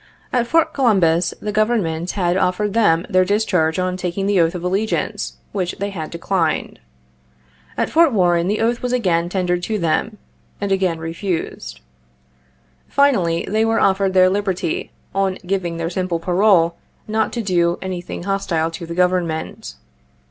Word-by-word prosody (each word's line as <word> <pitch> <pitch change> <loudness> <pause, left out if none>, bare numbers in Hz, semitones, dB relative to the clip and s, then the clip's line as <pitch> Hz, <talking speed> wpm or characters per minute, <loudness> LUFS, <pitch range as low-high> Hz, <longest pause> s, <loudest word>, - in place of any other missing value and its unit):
At 240 -2 +1
Fort 330 +5 +2
Columbus 185 - +3
the 210 - -3
Government 200 -6 0
had 175 -3 0
offered 190 +2 0
them 180 -7 +3
their 185 -3 +3
discharge 185 -5 +1
on 185 0 -1
taking 185 +2 -3
the 200 -3 +3
oath 165 +2 +1
of 175 - -5
allegiance, 195 +5 -1 0.2
which 180 -3 -2
they 200 +1 -3
had 160 -5 -5
declined. 170 -1 -1 1.0
At - - 0
Fort 330 -2 +5
Warren 175 -5 +2
the 210 +3 0
oath 235 +1 +1
was 250 0 -2
again 175 -8 +1
tendered 180 -1 0
to 215 +4 -2
them, 200 +5 -1 0.4
and 200 -1 -2
again 190 -3 +1
refused. 165 - -4 1.1
Finally, 195 -13 +2
they 220 +2 +1
were 225 0 +2
offered 195 0 +2
their 185 0 +6
liberty 190 -3 -1 0.2
on 195 -1 0
giving 175 -3 -2
their 165 0 -3
simple 180 -1 -1
parole 175 -1 +3 0.3
not 220 0 0
to 235 - -2
do 175 -3 +1
anything 180 -2 -5
hostile 175 -4 -1
to 165 0 -7
the 170 - -5
Government. 175 - -1
185 Hz, 155 wpm, -20 LUFS, 170-205 Hz, 1.1 s, their